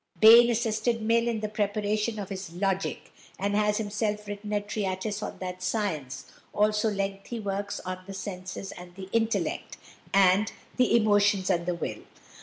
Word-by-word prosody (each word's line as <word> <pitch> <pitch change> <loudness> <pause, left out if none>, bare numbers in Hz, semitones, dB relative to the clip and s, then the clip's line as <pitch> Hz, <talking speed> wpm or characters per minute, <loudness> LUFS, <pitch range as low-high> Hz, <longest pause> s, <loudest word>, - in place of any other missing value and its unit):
Bain 235 +3 +9
assisted 230 0 0
Mill 230 +1 +3
in 225 -2 -1
the 215 - -1
preparation 210 +1 -1
of 200 -2 -5
his 190 -3 -6
"Logic," 195 +1 -2 0.2
and 200 +1 -1
has 210 0 +2
himself 210 0 -2
written 205 +1 -6
a 210 - +2
treatise 205 0 -3
on - - -5
that 185 0 -6
science, 185 - -2 0.3
also 210 +1 +2
lengthy 195 +3 -3
works 200 -1 -3
on 185 0 -5
"The 195 - -6
Senses 185 0 -6
and 175 0 -11
the 190 0 -8
Intellect," 230 0 0 0.3
and 195 +2 +4 0.3
"The 250 -1 +4
Emotions 205 -3 +3
and 170 -1 0
the 180 - 0
Will." 170 - -4
205 Hz, 160 wpm, -28 LUFS, 190-215 Hz, 0.3 s, Bain